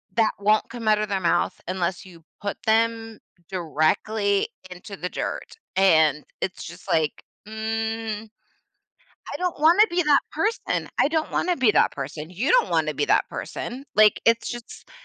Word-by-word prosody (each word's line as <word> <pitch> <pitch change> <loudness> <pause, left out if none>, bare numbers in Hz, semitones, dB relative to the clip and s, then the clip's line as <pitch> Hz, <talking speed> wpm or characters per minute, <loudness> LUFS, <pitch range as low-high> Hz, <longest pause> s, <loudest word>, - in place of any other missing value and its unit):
That 225 -2 +3
won't 210 +1 +2
come 235 -3 -7
out 215 - +5
of 215 0 -2
their 195 -1 0
mouth 175 -1 0
unless 185 +1 -2
you 170 -3 -15 0.2
put 200 0 -3
them 225 0 +1 0.3
directly 195 +5 0 0.2
into 195 +3 -9
the 180 - -4
dirt. - - -5 0.2
And 160 -5 +4 0.2
it's 190 - -3
just 175 +2 -11
like, 155 -2 0 0.2
mm, 220 0 -3 1.1
I - - -3
don't 360 -3 -2
wanna 335 +7 +6
be 350 +1 +1
that 295 -2 +4
person. 415 +9 -1
I - - +5
don't 315 +1 -1
wanna 355 0 0
be 255 -5 +4
that - - +3
person, 150 +3 -6
you 195 - -2
don't - - +4
wanna - - +1
be - - 0
that - - +2
person, 260 +3 -6
like, 215 0 +5
it's 230 0 +3
just 240 -1 -9
215 Hz, 165 wpm, -24 LUFS, 185-235 Hz, 1.1 s, wanna